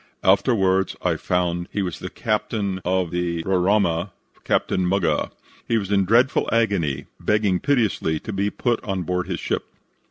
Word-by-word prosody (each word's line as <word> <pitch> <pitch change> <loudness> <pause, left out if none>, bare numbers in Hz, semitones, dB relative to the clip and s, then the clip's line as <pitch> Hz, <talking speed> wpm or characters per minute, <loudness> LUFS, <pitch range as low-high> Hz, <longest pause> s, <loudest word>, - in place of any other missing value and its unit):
Afterwards 95 -2 +3
I - - +2
found 90 -1 -1
he 100 - -1
was 90 -3 -4
the - - -6
captain 100 -4 -2
of 90 -1 0
the 85 -1 -1
Roraima, 95 -1 +2 0.3
Captain 95 - +1
Muggah. 95 0 +1 0.4
He 115 - +2
was 100 -2 -3
in 100 -1 +3
dreadful 120 +7 +3
agony, 90 -12 +1
begging 105 -3 +1
piteously 110 - +1
to 110 - -6
be 100 +1 0
put 120 +1 -1
on 95 -3 -2
board 90 +2 -2
his - - -3
ship. - - -2
95 Hz, 155 wpm, -23 LUFS, 90-105 Hz, 0.4 s, Afterwards